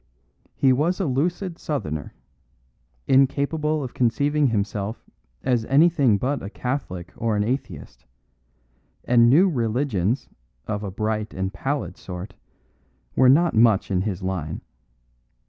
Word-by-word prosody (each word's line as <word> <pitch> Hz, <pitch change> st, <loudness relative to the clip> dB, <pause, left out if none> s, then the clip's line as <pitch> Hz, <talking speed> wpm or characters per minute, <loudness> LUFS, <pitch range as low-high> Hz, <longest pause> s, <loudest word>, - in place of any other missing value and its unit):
He 130 Hz, -2 st, +4 dB
was 160 Hz, +9 st, 0 dB
a 190 Hz, -, 0 dB
lucid 170 Hz, +6 st, -1 dB
Southerner, 80 Hz, -, -4 dB, 0.9 s
incapable 145 Hz, +3 st, +2 dB
of 125 Hz, -, -6 dB
conceiving 145 Hz, +4 st, +1 dB
himself 105 Hz, -1 st, -2 dB, 0.4 s
as 120 Hz, -3 st, +1 dB
anything 140 Hz, -5 st, +4 dB
but 135 Hz, +6 st, -2 dB
a 100 Hz, -, -6 dB
Catholic 100 Hz, -8 st, -4 dB
or 115 Hz, -1 st, -1 dB
an 105 Hz, -, +1 dB
atheist; 95 Hz, -, -5 dB, 1.0 s
and 120 Hz, -1 st, +5 dB
new 170 Hz, +10 st, +6 dB
religions 120 Hz, -, -1 dB, 0.4 s
of 105 Hz, -1 st, -3 dB
a 100 Hz, -, -4 dB
bright 110 Hz, +2 st, -3 dB
and 95 Hz, +1 st, -3 dB
pallid 140 Hz, +1 st, -3 dB
sort 95 Hz, -4 st, -8 dB, 0.8 s
were 130 Hz, -, +5 dB
not 165 Hz, +5 st, +4 dB
much 110 Hz, -3 st, +3 dB
in 90 Hz, -1 st, +1 dB
his 95 Hz, -2 st, -3 dB
line. 85 Hz, -4 st, -3 dB
120 Hz, 125 wpm, -23 LUFS, 100-140 Hz, 1.0 s, new